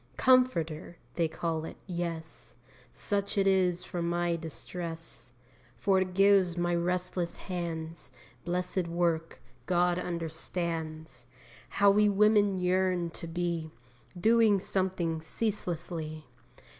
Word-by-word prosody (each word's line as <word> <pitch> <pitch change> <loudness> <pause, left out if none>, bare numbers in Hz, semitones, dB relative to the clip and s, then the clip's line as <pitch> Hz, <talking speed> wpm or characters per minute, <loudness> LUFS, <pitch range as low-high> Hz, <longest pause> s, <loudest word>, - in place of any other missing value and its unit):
'Comforter' 175 -11 +2 0.2
they 165 - +1
call 160 0 -2
it - - -7
yes, 170 -3 -5 0.4
Such 200 -1 -1
it 195 - +3
is 180 -2 +3
for 180 -2 -4
my 170 0 0
distress, 165 -5 -7 0.5
For 195 -2 +3
it 185 -1 -3
gives 195 -3 +4
my 175 0 +1
restless 180 0 -1
hands 165 -4 -5 0.3
Blessed 180 +1 -1
work. 170 -1 -1 0.3
God 175 0 +2
understands 160 -5 -4 0.4
How 200 0 +5
we 210 +1 +4
women 205 0 +4
yearn 180 -1 +1
to 170 - -8
be 170 -1 -2 0.5
Doing 220 0 +5
something 185 -4 -1
ceaselessly. 165 -5 -3
175 Hz, 105 wpm, -30 LUFS, 165-190 Hz, 0.5 s, How